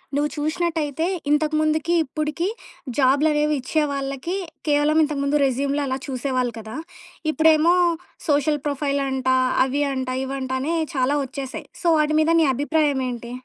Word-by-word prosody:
నువ్వు 295 +1 +1
చూసినట్టయితే, 315 -1 -1 0.3
ఇంతకు 305 +1 +2
ముందుకి 310 +2 +1
ఇప్పటికి 305 +5 -2 0.5
జాబులనేవి 295 +2 +3
ఇచ్చే 305 +4 0
వాళ్ళకి 275 +5 -3 0.3
కేవలం 295 +1 +3
ఇంతకు 295 -2 -2
ముందు 285 +1 +1
రెస్యూమ్‌లో 275 +2 0
అలా 260 0 -1
చూసేవాళ్ళు 255 -2 -1
కదా. 220 0 -8 0.6
ఇప్పుడేమో 315 +2 +4 0.5
సోషల్ 295 0 +2
ప్రొఫైల్ 280 0 -1
అంట, 265 -1 -3 0.4
అవి 280 +2 0
అంట, 260 -1 -3 0.2
ఇవంటనే 265 +3 -2 0.2
చాలా 265 +2 +2
వచ్చేసాయి. 265 0 -7
సో, 350 - -1
వాటి 305 0 +2
మీద 315 +1 +2
నీ - - +4
అభిప్రాయమేంటి? 265 -5 -1
290 Hz, 130 wpm, -22 LUFS, 265-310 Hz, 0.6 s, ఇప్పుడేమో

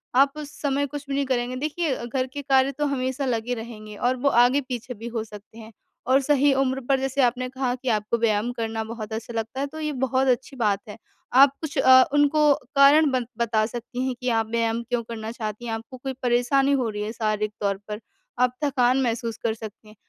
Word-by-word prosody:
आप 275 +1 +5
उस 295 -1 -7
समय 285 0 +1
कुछ 290 0 -7
भी 275 - -1
नहीं 280 0 0
करेंगे, 250 -1 -1
देखिए 300 +1 -1
घर 255 +1 -1
के 290 - -4
कार्य 270 -1 +3
तो 295 +2 -2
हमेशा 265 0 -1
लगे 240 -1 -1
रहेंगे 220 -2 -8
और 245 +4 0
वो - - +6
आगे 245 +3 +4
पीछे 250 -1 -6
भी 230 +1 -8
हो 230 -2 -3
सकते 210 +1 -13
हैं 220 0 -11 0.4
और 265 +1 +5
सही 285 0 +3
उम्र 265 0 0
पर 270 -1 +3
जैसे 270 +1 0
आपने 250 +1 +1
कहा 260 -1 -2
कि 255 0 -4
आपको 215 +1 0
व्यायाम 220 +1 +1
करना 225 -2 -3
बहुत 220 -1 -7
अच्छा 225 +1 -5
लगता 225 +4 -4
है 280 - -1
तो 315 +3 -9
ये 305 -1 -2
बहुत 260 +1 +1
अच्छी 260 +2 0
बात 210 -6 +1
है। 210 - -8 0.4
आप 270 +1 +7
कुछ 315 -3 -5
अ, 260 0 +7
उनको 290 0 +4 0.2
कारण 285 +2 +6
बन 255 -2 0
बता 225 -2 +1
सकती 245 +3 -5
हैं 260 - -1
कि 250 - 0
आप 225 -2 +1
व्यायाम 230 0 0
क्यों 240 -1 0
करना 225 -1 -6
चाहती 215 0 -5
हैं? 225 - -3
आपको 225 +3 -7
कोई 265 +1 -5
परेशानी 250 +3 +2
हो 255 -4 +1
रही 210 -1 -5
है 215 - -4
शारीरिक 215 -2 -1
तौर 200 -1 0
पर, 210 0 -5 0.4
आप 250 0 +3
थकान 260 -2 +2
महसूस 230 -2 -2
कर 230 -2 +1
सकती 220 -1 -10
हैं 215 - -15
245 Hz, 225 wpm, -24 LUFS, 225-270 Hz, 0.4 s, आप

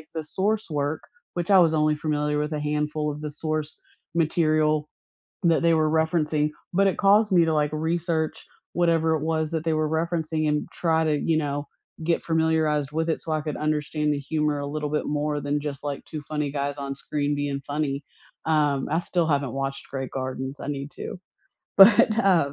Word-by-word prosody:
the 160 - -2
source 205 +7 -1
work, 145 0 -1 0.3
which 175 +3 -1
I 195 - +8
was 165 -3 +4
only 155 -1 +2
familiar 150 -1 -1
with 150 +1 -2
a 150 - -2
handful 150 0 -1
of 150 +1 -8
the 150 -1 -4
source 155 0 -3 0.4
material 155 -2 +2 0.5
that 165 -2 +3
they 170 - +5
were 155 -1 +3
referencing, 155 -1 +1 0.2
but 195 +2 +4
it 190 - 0
caused 205 +1 +5
me 175 -2 +6
to, 160 - +1
like, 150 -1 +1
research 160 0 -1 0.3
whatever 165 -2 +2
it 155 - -2
was 160 -1 0
that 160 -1 -2
they 165 - +2
were 155 0 0
referencing 160 -1 -1
and 150 0 0
try 160 -2 +1
to, 155 -2 +1
you 160 +2 +1
know, 145 -1 -2 0.4
get 170 +1 +1
familiarized 160 -3 +1
with 160 +1 0
it 160 - 0
so 160 - -5
I 155 - 0
could 150 -1 -4
understand 150 0 0
the 145 - -2
humor 150 0 -1
a 140 - -3
little 150 0 -3
bit 150 +1 -1
more 150 0 -1
than 145 +1 -1
just 145 -2 -5
like 145 -1 -4
2 155 - -6
funny 150 -1 -3
guys 145 0 -2
on 140 -1 -4
screen 145 +1 -2
being 145 -1 -2
funny. 145 -1 -2 0.4
Um, 150 -4 +2
I 160 - +2
still 170 -1 0
haven't 140 -5 +1
watched 135 0 -4
Grey 135 -1 -3
Gardens. 130 +1 -4
I - - -6
need 140 -1 -4
to. - - -7 0.6
But, 210 +2 +7
uh, 175 -9 +3
155 Hz, 195 wpm, -25 LUFS, 145-160 Hz, 0.6 s, I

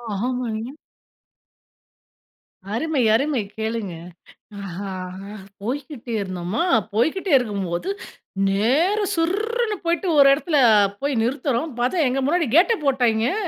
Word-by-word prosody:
ஆமாங்க. 240 0 -3 2.0
அருமை 290 +2 0
அருமை 275 -1 +1 0.2
கேளுங்க. 220 -4 -3 0.7
அ 195 0 -6 0.7
போய்க்கிட்டே 260 0 -5
இருந்தோமா, 185 - -3 0.3
போய்க்கிட்டே 320 - 0
இருக்கும்போது 200 - -3 0.6
,நேர 265 - +2 0.2
சுர்ருனு 425 +6 0
போய்ட்டு 340 +2 0
ஒரு 275 -1 +8
இடத்துல 305 0 0 0.4
போய் 275 -5 0
நிறுத்துறோம் 270 +2 -1
பார்த்தா 280 +4 +1
எங்க 265 +2 0
முன்னாடி 335 0 +1
கேட்டை 435 +6 +5
போட்டாய்ங்கெ 245 -1 +2
260 Hz, 95 wpm, -22 LUFS, 220-330 Hz, 2.0 s, ஒரு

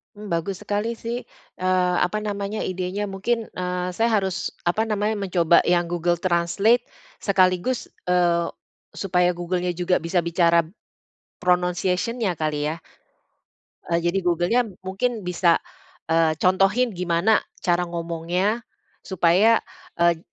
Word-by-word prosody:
Mmm, 210 -1 -9
bagus 175 +3 -2
sekali 210 +3 -1
sih, 235 +2 -4 0.4
eee, 185 -1 +2
apa 180 +4 -2
namanya 205 0 -3
idenya 185 +2 -3
mungkin, 225 +4 -1
eee, 180 0 -3
saya 225 +5 +1
harus 190 -1 -2
apa 195 +6 +1
namanya 210 0 0
mencoba 175 -4 +3
yang 175 0 +3
Google 175 0 +1
Translate, 185 +7 +2 0.4
sekaligus, 190 +4 +2 0.2
eee, 175 -1 +2 0.5
supaya 180 -2 +1
Google-nya 175 0 -2
juga 180 0 +1
bisa 170 +2 0
bicara 170 0 +3 0.8
pronounciation-nya 180 +3 0
kali 150 -1 -1
ya? 160 - -4 1.1
Eee, 170 0 +2
jadi 175 +3 +1
Google-nya 175 +7 +2 0.2
mungkin 215 +4 -2
bisa, 175 -1 +3 0.5
eee, 165 -1 +3
contohin 195 +7 +3
gimana 180 +3 +2 0.3
cara 180 -1 +2
ngomongnya, 170 +5 -1 0.5
supaya, 190 +5 +4 0.4
eee, 170 -1 +4
180 Hz, 120 wpm, -23 LUFS, 175-200 Hz, 1.1 s, supaya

